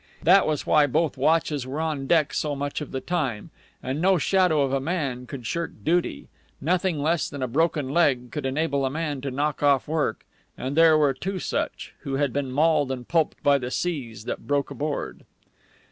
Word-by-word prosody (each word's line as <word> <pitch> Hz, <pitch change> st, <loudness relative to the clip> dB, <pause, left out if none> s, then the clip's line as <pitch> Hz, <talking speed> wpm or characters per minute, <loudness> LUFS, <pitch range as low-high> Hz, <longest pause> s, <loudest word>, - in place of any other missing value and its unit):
That 190 Hz, +4 st, +6 dB
was 155 Hz, -2 st, -1 dB
why 150 Hz, -1 st, +4 dB
both 155 Hz, +1 st, 0 dB
watches 145 Hz, -1 st, +1 dB
were 140 Hz, +4 st, -4 dB
on 155 Hz, -4 st, -2 dB
deck 155 Hz, -2 st, +3 dB
so 150 Hz, -2 st, -1 dB
much 145 Hz, +2 st, -3 dB
of 150 Hz, -, -6 dB
the 130 Hz, -, -3 dB
time. 140 Hz, -12 st, -2 dB, 0.3 s
And 135 Hz, +4 st, -2 dB
no 190 Hz, +1 st, +4 dB
shadow 175 Hz, -3 st, +3 dB
of 135 Hz, -1 st, -1 dB
a 135 Hz, -, +2 dB
man 135 Hz, -5 st, -3 dB
could 125 Hz, -3 st, -8 dB
shirk 170 Hz, +5 st, -3 dB
duty. 170 Hz, -, 0 dB, 0.3 s
Nothing 175 Hz, +1 st, 0 dB
less 165 Hz, +2 st, +1 dB
than 140 Hz, -2 st, -5 dB
a -, -, 0 dB
broken 150 Hz, +2 st, +1 dB
leg 135 Hz, -6 st, +2 dB
could -, -, -4 dB
enable 140 Hz, 0 st, 0 dB
a 135 Hz, -, +1 dB
man 150 Hz, -1 st, -3 dB
to 140 Hz, -, -3 dB
knock 145 Hz, +2 st, -2 dB
off 140 Hz, -2 st, +3 dB
work; 150 Hz, -7 st, -1 dB, 0.3 s
and 130 Hz, +2 st, -4 dB
there 160 Hz, -1 st, +6 dB
were 145 Hz, -3 st, +3 dB
two 190 Hz, +8 st, -4 dB
such, -, -, -3 dB
who 135 Hz, -, -4 dB
had 140 Hz, -2 st, 0 dB
been 140 Hz, -2 st, -1 dB
mauled 150 Hz, -1 st, +2 dB
and 125 Hz, -2 st, -5 dB
pulped 165 Hz, -2 st, 0 dB
by 140 Hz, -1 st, +4 dB
the 125 Hz, -1 st, -4 dB
seas 125 Hz, -9 st, -3 dB
that -, -, -5 dB
broke 140 Hz, 0 st, 0 dB
aboard. 145 Hz, +2 st, -4 dB
145 Hz, 200 wpm, -25 LUFS, 135-160 Hz, 0.3 s, That